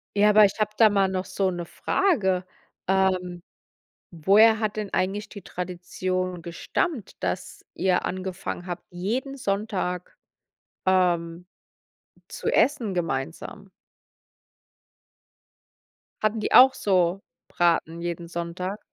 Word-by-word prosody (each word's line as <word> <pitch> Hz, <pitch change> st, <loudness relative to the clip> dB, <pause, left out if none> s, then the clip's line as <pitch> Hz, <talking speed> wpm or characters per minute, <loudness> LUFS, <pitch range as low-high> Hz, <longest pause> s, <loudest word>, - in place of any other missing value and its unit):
Ja, 210 Hz, +1 st, +5 dB
aber 210 Hz, 0 st, +7 dB
ich 200 Hz, +2 st, -2 dB
habe 210 Hz, 0 st, +1 dB
da 220 Hz, -2 st, +7 dB
mal 195 Hz, -1 st, +2 dB
noch 185 Hz, 0 st, -2 dB
so 190 Hz, 0 st, -1 dB
'ne 175 Hz, -1 st, -5 dB
Frage: 190 Hz, -, 0 dB, 0.4 s
Ähm, 185 Hz, -2 st, 0 dB, 0.7 s
woher 210 Hz, +7 st, +5 dB
hat 215 Hz, -1 st, -1 dB
denn 210 Hz, -2 st, -4 dB
eigentlich 200 Hz, +3 st, -1 dB
die 200 Hz, -, -10 dB
Tradition 180 Hz, 0 st, -4 dB
gestammt, 225 Hz, -, -3 dB
dass -, -, -4 dB
ihr 185 Hz, -1 st, +1 dB
angefangen 185 Hz, -1 st, -4 dB
habt, 175 Hz, 0 st, -6 dB
jeden 235 Hz, +10 st, -3 dB
Sonntag, 195 Hz, -5 st, -3 dB, 0.7 s
ähm, 175 Hz, -2 st, +1 dB, 0.8 s
zu -, -, -7 dB
essen 240 Hz, -9 st, +2 dB
gemeinsam? 170 Hz, -, -4 dB, 2.5 s
Hatten 215 Hz, +1 st, +1 dB
die 215 Hz, -, -2 dB
auch 260 Hz, +1 st, +9 dB
so 185 Hz, -1 st, +1 dB, 0.3 s
Braten 170 Hz, -1 st, 0 dB
jeden 170 Hz, 0 st, -4 dB
Sonntag? 175 Hz, +4 st, -4 dB
185 Hz, 110 wpm, -25 LUFS, 175-210 Hz, 2.5 s, auch